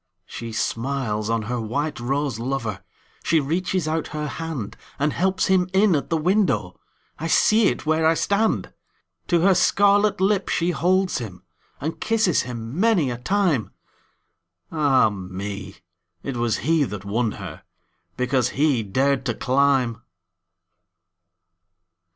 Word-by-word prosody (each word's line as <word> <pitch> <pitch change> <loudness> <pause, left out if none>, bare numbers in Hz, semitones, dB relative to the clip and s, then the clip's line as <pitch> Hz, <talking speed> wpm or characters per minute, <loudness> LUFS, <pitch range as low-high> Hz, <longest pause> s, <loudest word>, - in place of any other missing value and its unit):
She 115 0 -7
smiles 115 -2 -2
on 115 -1 0
her 120 +2 -3
white 140 +6 -2
rose 135 -1 -1
lover, 115 -5 -3 0.4
She 165 - +3
reaches 175 +3 -1
out 160 0 -1
her 150 0 -2
handAnd 150 -1 -4
helps 190 +3 0
him 185 -1 +2
in 195 -2 +4
at 140 - -2
the 165 - +1
window—I 165 - -2
see 215 +6 +4
it - - -2
where 155 +1 +1
I 165 - +4
stand! 205 +5 0 0.5
To 170 -2 +2
her 195 +2 +5
scarlet 205 +3 +3
lip 195 0 +1
she 175 +1 +1
holds 185 +1 +1
him, 95 -6 -8 0.4
And 155 +4 -4
kisses 220 -7 +2
him 120 +4 -6
many 190 - +3
a 120 - -5
time—Ah, 130 - -1
me! 95 0 -6 0.5
it 135 - -4
was 120 -2 0
he 160 -1 +3
that 105 -6 -5
won 110 +2 0
herBecause 125 -1 -4
he 140 -4 +2
dared 130 +6 0
to 120 - -1
climb! 130 -3 +1
140 Hz, 125 wpm, -23 LUFS, 115-175 Hz, 0.5 s, her